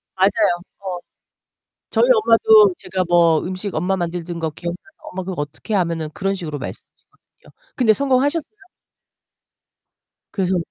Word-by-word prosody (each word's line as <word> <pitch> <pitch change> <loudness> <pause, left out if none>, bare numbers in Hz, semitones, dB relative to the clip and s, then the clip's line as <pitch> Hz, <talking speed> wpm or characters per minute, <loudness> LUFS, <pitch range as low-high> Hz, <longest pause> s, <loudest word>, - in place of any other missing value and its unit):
맞아요. 195 +1 +3 0.3
어. 190 -2 -5 0.9
저희 225 +1 +3
엄마도 220 -3 +5
제가 185 0 -3
뭐 170 -2 +4
음식 185 +2 -5
엄마 180 +4 0
만들던 175 -1 -4
거 160 -1 -2
기억나서 170 +3 -5 0.3
"엄마 190 +1 -5
그거 180 -4 -4
어떻게 145 +9 -6
해?" - - +4
하면은 165 -3 -1
그런 195 0 -1
식으로 160 -6 -5
말씀하시거든요. - - -12 0.3
근데 235 -4 +4
성공하셨어요? 280 - 0 1.7
그래서 190 -2 0
185 Hz, 325 characters per minute, -20 LUFS, 170-215 Hz, 1.7 s, 엄마도